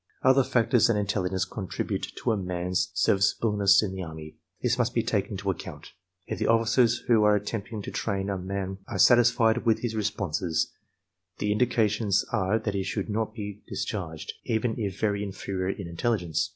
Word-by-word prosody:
Other 130 +1 +5
factors 120 -1 +3
than 115 -3 +2
intelligence 95 -2 0
contribute 95 -4 -4 0.2
to 120 - +2
a - - +2
man's 90 -2 -1
serviceableness 100 +1 +3
in 100 - -2
the 95 - -5
Army. 80 -2 -8 0.2
These - - 0
must - - 0
be - - +2
taken - - -1
into - - -1
account. - - -9 0.3
If - - -5
the - - 0
officers 115 +1 +3
who 115 -3 +5
are 105 0 +5
attempting 105 +1 -4
to - - -6
train 100 -3 -2
a 100 - -1
man 95 +1 -4
are 105 - -4
satisfied 120 +3 +5
with 115 -2 +2
his 120 -2 -1
responses, 95 -6 -1 0.7
the 105 - -1
indications 105 -2 +2
are 105 -2 +1
that 110 -2 -3
he 100 - -1
should 100 +2 -3
not 110 +1 -2
be 105 -2 -6
discharged, 85 -6 -4
even 115 -1 0
if 100 -3 -3
very 100 -2 0
inferior 95 -2 -3
in 95 -2 -4
intelligence. 85 -2 -1
105 Hz, 175 wpm, -27 LUFS, 95-110 Hz, 0.7 s, Other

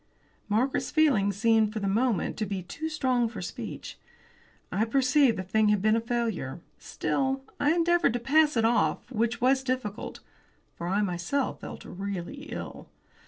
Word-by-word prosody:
Margaret's 240 +6 +1
feelings 215 -11 +3
seemed 220 0 +3
for 220 - -5
the 200 - -2
moment 220 -1 +1
to 215 - -2
be 190 -2 -3
too 315 - -5
strong 255 -6 +1
for 220 -3 -8
speech. 180 - -7 0.7
I 210 - +1
perceived 255 +1 +3
the 185 - -3
thing 215 +3 +2
had 210 -1 +3
been 215 +3 +3
a 230 - +1
failure. 225 - -2 0.2
Still, 270 0 -1 0.2
I 295 +3 +3
endeavoured 345 -5 +3
to 245 - -1
pass 295 +3 +3
it 225 - +3
off, 240 +2 +1
which 230 0 0
was 265 +2 +4
difficult, 255 -6 -3 0.6
for 170 - -5
I 200 +3 +1
myself 185 +9 -1
felt - - -8
really 200 - -5
ill. - - -7
230 Hz, 165 wpm, -28 LUFS, 200-265 Hz, 0.7 s, was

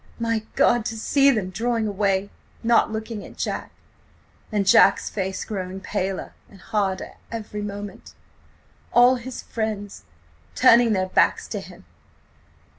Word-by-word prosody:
My 230 -1 -1
God, 240 -2 +3
to 225 -2 -3
see 275 +5 +3
them 210 -8 0
drawing 230 +3 -1
away–not 205 +3 0
looking 220 -1 -5
at - - -13
Jack! - - -3 0.8
And 205 -2 0
Jack's 195 +1 +5
face–growing 190 -1 -4
paler 195 -2 -3 0.2
and 195 - -16
harder... 195 -1 -2
every 215 -2 -5
moment.... 205 0 -7 0.8
All 245 +1 +6
his 250 +1 -7
friends... 215 -3 -4 0.5
turning 230 - +6
their 185 -1 0
backs - - +2
to - - -3
him. - - -13
210 Hz, 120 wpm, -23 LUFS, 195-230 Hz, 0.8 s, All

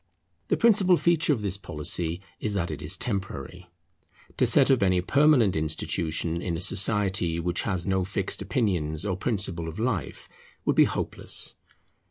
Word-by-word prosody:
The - - +1
principal 200 -6 +4
feature 170 -2 +1
of 115 -7 -1
this 100 -1 -2
policy 85 0 -3 0.2
is 105 -2 -3
that 85 -4 -2
it 75 - -6
is 85 +6 0
temporary. 95 - -5 0.7
To - - +3
set - - +5
up 130 - +2
any 95 -2 +2
permanent 135 - +3
institution 80 +1 -1
in 85 -2 -3
a - - -6
society 95 -3 +2
which 85 +1 -1
has 95 -3 -2
no 95 -1 0
fixed 95 +1 -3
opinions 90 -6 -1
or 95 -3 -1
principles 95 -5 -1
of 80 - -8
life, 110 - -3 0.4
would - - +1
be - - +6
hopeless. - - -1
95 Hz, 160 wpm, -26 LUFS, 85-105 Hz, 0.7 s, be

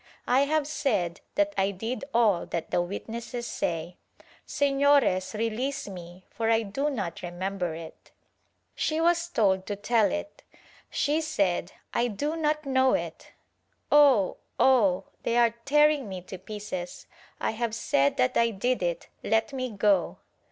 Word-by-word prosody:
I 265 +3 +3
have 305 0 +1
said 200 - -1
that 305 0 +2
I 195 +1 +2
did 225 +7 -4
all 220 -7 +2
that 170 - -4
the - - +2
witnesses 230 +6 -5
say. 170 -2 -3 0.5
Sefiores 280 -9 +2
release 250 +5 -2
me, 180 -1 -10
for 225 -1 -1
I 225 0 +3
do 270 +9 -1
not 200 - -4
remember 180 -1 -3
it." 165 -1 -11 0.6
She 310 0 -1
was 340 0 +2
told 190 - +1
to 205 - -2
tell 210 0 +2
it. 205 +9 -5 0.5
She 300 +2 +1
said 195 - 0 0.2
"I 240 - +2
do 290 +9 -2
not 305 -1 0
know 260 -1 +3
it. - - -6 0.6
Oh! 275 -10 +5 0.2
Oh! 200 -8 +4 0.2
they 235 - 0
are 235 -2 +4
tearing 295 -3 +3
me 185 -2 -6
to 185 0 -9
pieces 190 -3 -6 0.2
— - - -26
I - - 0
have 225 0 -2
said 140 -10 +1
that 125 - +2
I 230 0 +4
did 245 +3 -1
it 175 -1 -2
— - - -40
let 225 +4 +1
me 255 -1 -2
go." 200 -4 +1
225 Hz, 155 wpm, -27 LUFS, 190-275 Hz, 0.6 s, Oh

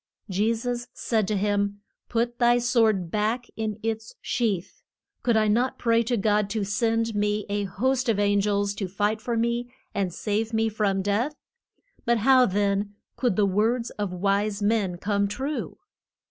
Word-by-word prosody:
Je 210 +5 +2
sus 245 +1 -3
said 220 -4 0
to 210 - 0
him, 205 0 0 0.3
Put 235 +1 -1
thy 240 0 +5
sword 225 -8 +2
back 220 +4 0
in 215 -2 -3
its 225 0 -3
sheath. 210 -8 -2 0.4
Could 235 -2 +2
I 215 0 +3
not 240 +5 +1
pray 230 -1 +3
to 235 +1 0
God 210 0 +2
to 215 -1 -1
send 225 +2 0
me 210 0 0
a 205 0 -1
host 255 +7 0
of 220 - +2
an 205 0 +3
gels 200 0 0
to 195 - -2
fight 205 +3 -1
for 235 +1 -2
me 235 +1 -1 0.2
and 190 -3 -1
save 215 +5 -2
me 225 0 +2
from 200 -3 0
death? 225 +9 0 0.7
But 235 0 +2
how 255 +2 +5
then 200 +1 0 0.2
could 245 -7 +1
the 205 - +3
words 225 +5 +1
of 205 -3 -3
wise 200 +3 0
men 205 -4 +1
come 200 +2 0
true? 270 +8 -4
215 Hz, 170 wpm, -26 LUFS, 200-235 Hz, 0.7 s, thy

